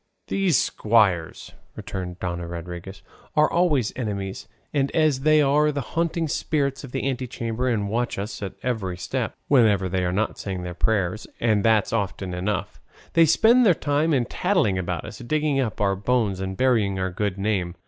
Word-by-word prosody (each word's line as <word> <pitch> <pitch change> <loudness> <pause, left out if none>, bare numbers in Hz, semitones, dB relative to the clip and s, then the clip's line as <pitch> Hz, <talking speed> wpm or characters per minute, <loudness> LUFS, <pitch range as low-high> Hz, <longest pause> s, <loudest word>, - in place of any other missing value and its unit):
'" - - -51
"These 190 -8 +2
squires," 100 -7 +1 0.2
returned 90 -2 -6
Dona 85 -1 -3
Rodriguez, 85 +3 -7 0.3
"are 155 0 +5
always 155 -10 +2
our 130 - -6
enemies; 100 -3 -4 0.3
and 140 -2 +1
as 155 -4 +3
they 155 +2 +4
are 150 +2 +3
the 140 -3 -5
haunting 170 0 0
spirits 140 -2 -1
of 135 - -9
the 135 0 -2
antechambers 125 -2 -2
and 105 -3 0
watch 120 +4 -1
us 105 +2 -5
at 100 -2 -4
every 105 -8 -2
step, - - -3
whenever 110 -8 +4
they 90 0 -1
are 90 - 0
not 105 +4 -1
saying 95 -2 -4
their 90 0 -5
prayers 100 +1 0
(and 110 -4 +2
that's 110 -2 +3
often 95 -3 -2
enough) 95 +3 -3 0.3
they 165 -1 +6
spend 230 +10 +5
their 190 -7 +5
time 150 +3 0
in 130 -5 +2
tattling 95 -3 +1
about 90 -3 -3
us, - - -9
digging 150 +2 0
up 120 -5 -2
our 100 -1 +2
bones 105 -1 0
and 95 0 -4
burying 110 -7 +2
our 95 0 -1
good 100 +1 -2
name. 95 -4 -1
110 Hz, 180 wpm, -24 LUFS, 95-140 Hz, 0.3 s, they